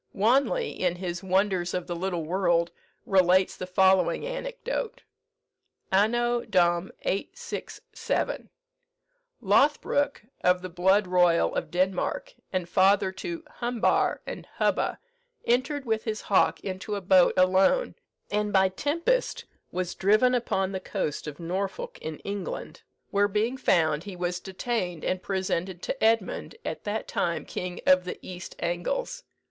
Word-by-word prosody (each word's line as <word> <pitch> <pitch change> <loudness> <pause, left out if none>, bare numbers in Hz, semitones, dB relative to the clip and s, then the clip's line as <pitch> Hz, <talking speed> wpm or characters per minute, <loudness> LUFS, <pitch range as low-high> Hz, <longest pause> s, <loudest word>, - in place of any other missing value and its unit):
Wanley, 270 - +2
in 180 -2 -1
his 175 -1 -4
"Wonders 190 -2 +1
of 180 - -2
the 175 - -4
Little 175 -1 -2
World," 170 -1 +1 0.3
relates 185 0 +4
the 185 - -6
following 190 - +3
anecdote: - - -4 0.9
"Anno 240 +5 +2
Dom. 175 -2 +2
867. 470 - -3 0.9
Lothbroke, 280 +6 +2 0.2
of 180 0 +3
the 185 - -5
blood 190 +4 +3
royal 180 -2 +3
of - - -2
Denmark, 190 - -1 0.2
and 185 -2 -1
father 190 +2 +3
to 330 - -6 0.2
Humbar 240 -1 +1
and - - -7
Hubba, - - +1 0.5
entered 265 +4 +1
with 220 -2 -1
his 215 -2 -2
hawk 200 - +2
into 190 +2 -4
a - - -2
boat 185 -1 +5
alone, 190 - +4 0.4
and 210 0 0
by 190 -1 +4
tempest 335 - 0 0.3
was 180 -1 -2
driven 215 +6 +3
upon 195 -6 0
the 190 - -3
coast 175 -7 -3
of 145 -1 -7
Norfolk 190 +3 -4
in 155 -1 -5
England; 200 -2 -5 0.3
where 205 0 +3
being 215 +5 0
found, 160 - +2
he 200 -2 -7
was 175 0 -2
detained, 185 -3 -3
and 185 0 -1
presented 185 -2 -2
to 270 - -3
Edmund, 225 - +1
at - - -5
that 210 +1 -2
time 170 -1 -1
King 180 0 -5
of 185 -1 +5
the 180 - -5
East 185 0 -8
Angles. 175 - -2
190 Hz, 135 wpm, -27 LUFS, 180-230 Hz, 0.9 s, boat